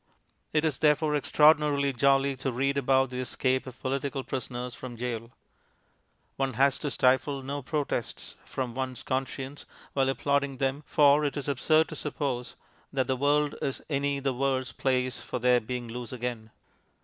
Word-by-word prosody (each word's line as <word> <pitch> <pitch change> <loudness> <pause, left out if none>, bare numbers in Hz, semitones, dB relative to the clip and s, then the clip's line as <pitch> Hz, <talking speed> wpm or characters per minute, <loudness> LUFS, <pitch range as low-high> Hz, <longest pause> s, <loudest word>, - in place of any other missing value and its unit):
It 155 +1 +2
is, 150 -5 0
therefore, 150 0 +3
extraordinarily 150 -1 +4
jolly 135 +2 +3
to 135 0 -2
read 135 +3 0
about 135 -1 +2
the 125 - -4
escape 130 +1 0
of 125 -1 -10
political 135 +1 -2
prisoners 125 -2 -4
from 125 -2 -8
gaol. 115 -1 -4 1.1
One 135 -1 0
has 135 +3 +3
to 145 - -2
stifle 135 +1 +2
no 140 +2 -4
protests 140 -4 -3
from 125 -3 -4
one's 130 -1 -4
conscience 135 +1 -4 0.3
while 135 -1 +2
applauding 140 0 0
them, 135 +2 0
for 145 0 +5
it 145 0 -1
is 145 - -4
absurd 155 +3 +3
to - - -6
suppose 135 -4 -3 0.4
that 135 -2 +1
the 130 - 0
world 145 +2 +2
is 135 - -3
any 140 -1 0
the 135 -1 0
worse 130 -1 0
place 130 +1 0
for - - -4
their 125 0 +4
being 125 +1 -4
loose 120 +1 -6
again. 120 -3 -4
135 Hz, 160 wpm, -28 LUFS, 125-140 Hz, 1.1 s, for